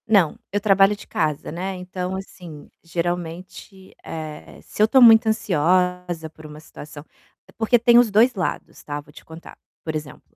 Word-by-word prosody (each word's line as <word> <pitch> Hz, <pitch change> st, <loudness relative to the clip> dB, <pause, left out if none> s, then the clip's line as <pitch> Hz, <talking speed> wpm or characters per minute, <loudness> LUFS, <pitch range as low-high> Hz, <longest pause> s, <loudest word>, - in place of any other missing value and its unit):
Não, 200 Hz, -8 st, +3 dB
eu 205 Hz, -, 0 dB
trabalho 195 Hz, 0 st, +3 dB
de 205 Hz, -, -14 dB
casa, 150 Hz, -2 st, -2 dB
né, 185 Hz, +4 st, -4 dB
então 180 Hz, 0 st, -5 dB
assim, 175 Hz, -5 st, -10 dB
geralmente, 175 Hz, +3 st, -6 dB
eh, 155 Hz, -2 st, -9 dB
se -, -, -6 dB
eu 215 Hz, -, +6 dB
tô 265 Hz, -, +4 dB
muito 225 Hz, -2 st, +7 dB
ansiosa 180 Hz, -4 st, 0 dB
por 155 Hz, 0 st, -16 dB
uma 150 Hz, 0 st, -11 dB
situação 150 Hz, -1 st, -12 dB, 0.5 s
porque 230 Hz, +2 st, +3 dB
tem 240 Hz, 0 st, +5 dB
os 240 Hz, -2 st, +3 dB
2 225 Hz, +5 st, +4 dB
lados, 190 Hz, -4 st, -5 dB
tá, 145 Hz, 0 st, -5 dB
vou 150 Hz, -, -20 dB
te 150 Hz, -, -16 dB
contar. 160 Hz, +1 st, -13 dB, 0.3 s
Por 160 Hz, -1 st, -4 dB
exemplo, 150 Hz, -2 st, -9 dB
180 Hz, 170 wpm, -22 LUFS, 160-205 Hz, 0.5 s, muito